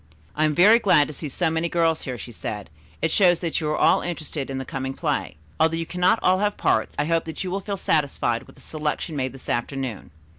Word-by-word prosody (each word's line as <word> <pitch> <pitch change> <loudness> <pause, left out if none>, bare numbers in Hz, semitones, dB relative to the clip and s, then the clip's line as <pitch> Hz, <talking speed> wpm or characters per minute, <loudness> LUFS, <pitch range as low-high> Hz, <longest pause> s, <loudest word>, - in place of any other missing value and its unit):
"I 155 - +2
am 150 -1 +1
very 210 +8 +7
glad 190 -9 +5
to - - -6
see 150 +2 -6
so 160 +4 0
many 165 +1 -1
girls 165 -2 +1
here," 125 -2 -4
she 120 - -9
said. 105 -2 -6 0.3
"It 165 - +2
shows 175 -3 +4
that 165 -2 -1
you 155 - -1
are 155 - 0
all - - +4
interested 155 -5 -4
in 135 - -3
the 135 - -4
coming 135 0 -4
play. - - -2 0.2
Although 160 +1 +3
you 165 - -2
cannot 180 +5 +2
all 185 0 +4
have 210 0 0
parts, - - +1
I 145 - +1
hope 165 +1 +1
that 160 +2 -5
you 185 - -4
will 195 +1 -2
feel 200 0 -4
satisfied 140 -9 0
with - - -16
the - - -15
selection 155 +1 -3
made 130 -2 -1
this 135 - -12
afternoon. 125 -3 -3
160 Hz, 245 wpm, -24 LUFS, 135-175 Hz, 0.3 s, very